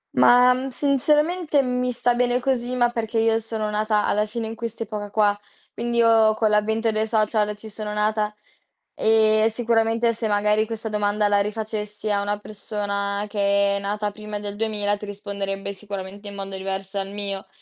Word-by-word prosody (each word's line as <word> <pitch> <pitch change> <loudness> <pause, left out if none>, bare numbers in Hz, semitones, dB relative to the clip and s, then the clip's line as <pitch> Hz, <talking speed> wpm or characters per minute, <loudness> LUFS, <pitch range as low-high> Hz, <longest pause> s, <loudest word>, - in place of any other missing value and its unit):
Ma, 250 +1 +6
mhmm, 255 +1 -3
sinceramente 295 +4 +2
mi 250 0 -1
sta 245 0 +1
bene 245 0 +1
così, 250 -1 -1
ma 240 -1 +3
perché 230 -1 -3
io 225 0 +3
sono 220 -1 -3
nata 210 0 +1
alla 210 +1 +1
fine 225 +1 -4
in 220 - -5
quest'epoca 220 -2 -5
qua, 205 -1 +2 0.4
quindi 235 0 -2
io 225 -2 +5
con 215 -1 +1
l'avvento 220 +2 +2
dei 215 0 0
social 215 -1 +1
ci 220 - -10
sono 210 0 -6
nata 210 0 0 0.6
e 220 0 +4
sicuramente 230 0 +1
se 225 0 -3
magari 210 +1 +2
questa 225 0 -5
domanda 210 0 +1
la 205 0 +3
rifacessi 210 0 -3
a 200 -1 +1
una 205 +1 -1
persona 205 -1 -3
che 200 -1 +2
è - - -3
nata 205 +1 -2
prima 210 0 -6
del 205 0 -5
2000, 205 -1 -1
ti 210 - -8
risponderebbe 200 -1 -4
sicuramente 200 0 -7
in 200 - -7
modo 195 -1 -5
diverso 195 +1 -4
dal 195 0 -4
mio. 200 -1 -5
215 Hz, 175 wpm, -23 LUFS, 205-230 Hz, 0.6 s, Ma